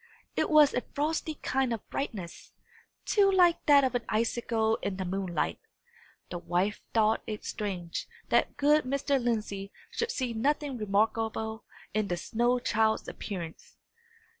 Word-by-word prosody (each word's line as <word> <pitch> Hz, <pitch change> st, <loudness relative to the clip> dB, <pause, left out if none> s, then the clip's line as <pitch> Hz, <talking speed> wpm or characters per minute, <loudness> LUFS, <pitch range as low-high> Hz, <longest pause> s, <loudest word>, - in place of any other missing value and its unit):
It -, -, +1 dB
was 305 Hz, -2 st, +6 dB
a 250 Hz, -, +1 dB
frosty 310 Hz, +3 st, -2 dB
kind 265 Hz, -2 st, +1 dB
of 230 Hz, -3 st, -4 dB
brightness, 195 Hz, -11 st, -5 dB, 0.5 s
too 400 Hz, -2 st, +4 dB
like 355 Hz, -3 st, +4 dB
that 285 Hz, -2 st, +7 dB
of 260 Hz, -, +1 dB
an 245 Hz, -1 st, 0 dB
icicle 225 Hz, 0 st, +1 dB
in 195 Hz, -2 st, -3 dB
the 190 Hz, -, -3 dB
moonlight. 185 Hz, -1 st, -2 dB, 0.7 s
The 175 Hz, -, -3 dB
wife 180 Hz, +5 st, 0 dB
thought 220 Hz, -1 st, +3 dB
it 215 Hz, -1 st, -5 dB
strange 180 Hz, -5 st, -4 dB, 0.2 s
that -, -, +2 dB
good 295 Hz, +1 st, +4 dB
Mr. 275 Hz, 0 st, 0 dB
Lindsey 210 Hz, -4 st, -2 dB, 0.2 s
should 465 Hz, -, -1 dB
see 255 Hz, -, -2 dB
nothing 285 Hz, +4 st, 0 dB
remarkable 220 Hz, +2 st, 0 dB, 0.3 s
in 215 Hz, -1 st, +1 dB
the 175 Hz, -, -1 dB
snow 240 Hz, +6 st, +1 dB
child's 220 Hz, -2 st, +1 dB
appearance. 170 Hz, -6 st, -7 dB
225 Hz, 140 wpm, -29 LUFS, 200-275 Hz, 0.7 s, that